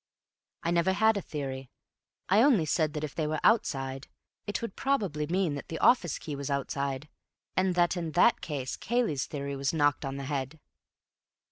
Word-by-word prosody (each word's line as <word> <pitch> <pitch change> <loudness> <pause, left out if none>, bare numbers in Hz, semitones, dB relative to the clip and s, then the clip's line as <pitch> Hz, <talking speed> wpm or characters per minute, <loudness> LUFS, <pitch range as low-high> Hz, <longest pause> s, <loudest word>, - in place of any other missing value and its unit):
"I 170 - 0
never 175 +2 +3
had 220 +2 +4
a 200 - -1
theory. 135 -5 -5 0.6
I 200 +4 +5
only 235 - +5
said 155 -1 +1
that 150 -1 -4
if 150 - -4
they 155 -2 -1
were 155 0 -1
outside, 135 - +1 0.4
it 205 - -1
would 230 -4 -5
probably 200 - 0
mean 180 -2 +1
that 140 - -6
the 165 - -5
office 175 - +3
key 150 - -6
was 140 0 -5
outside, 140 0 -2 0.5
and 185 -1 +2
that 175 0 +3
in 165 -3 -4
that 205 +6 +4
case 145 -7 -4
Cayley's 230 - 0
theory 140 -1 -4
was 135 +1 -1
knocked 145 -2 +2
on 135 0 -4
the 140 - -5
head." 140 +2 -3
155 Hz, 180 wpm, -29 LUFS, 140-185 Hz, 0.6 s, I